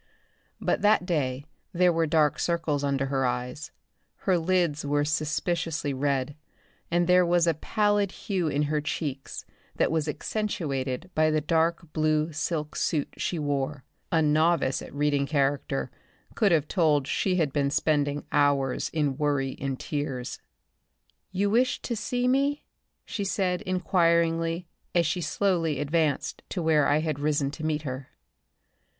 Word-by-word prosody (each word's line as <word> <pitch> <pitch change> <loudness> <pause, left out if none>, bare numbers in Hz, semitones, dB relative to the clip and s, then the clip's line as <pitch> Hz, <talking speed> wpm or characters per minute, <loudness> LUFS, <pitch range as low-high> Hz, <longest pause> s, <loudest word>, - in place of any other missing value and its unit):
But - - 0
that 210 -3 +4
day 140 -6 -1 0.3
there 180 0 +4
were 165 0 +1
dark 150 -1 +2
circles 160 -4 0
under 140 -1 0
her 135 -1 0
eyes, 125 +3 -3 0.6
her 190 - +4
lids 170 -3 +1
were 145 0 +1
suspiciously 155 0 -1
red 140 +1 -1 0.5
and 175 +1 +2
there 180 +1 +5
was 175 0 +3
a 165 - +3
pallid 205 +4 +1
hue 190 -5 -2
in 150 0 +1
her 150 0 0
cheeks 145 -3 -4 0.3
that - - +1
was 160 -1 0
accentuated 150 - -3
by 155 0 +3
the 155 0 +2
dark 165 +1 0
blue 155 0 +1
silk 150 0 -2
suit 150 -4 -1
she 175 - -2
wore. 145 -2 -2 0.3
A 160 -1 +3
novice 155 -2 +2
at - - -9
reading 145 0 +1
character 140 -2 0 0.4
could 205 -4 +2
have 155 -3 +2
told 155 -7 +2
she 185 +6 0
had 155 -6 +1
been 140 -2 +1
spending 145 -1 0
hours 140 -2 +2
in 145 -4 -1
worry 140 -3 0
and 135 -1 -2
tears. 135 -4 -4 0.9
"You 200 +2 0
wished 250 +3 +2
to 235 - -2
see 245 +3 -1
me?" 280 +3 +1 0.4
she 205 - -3
said, 190 -2 0
inquiringly, 170 -2 +1 0.3
as 170 -1 +4
she 180 +3 -1
slowly 165 -2 0
advanced 150 -1 0
to 180 - -3
where 155 -3 +3
I 150 +2 +3
had 155 -3 -2
risen 145 -1 0
to 155 - -8
meet 155 -1 -1
her. 130 -1 -5
155 Hz, 150 wpm, -27 LUFS, 145-175 Hz, 0.9 s, there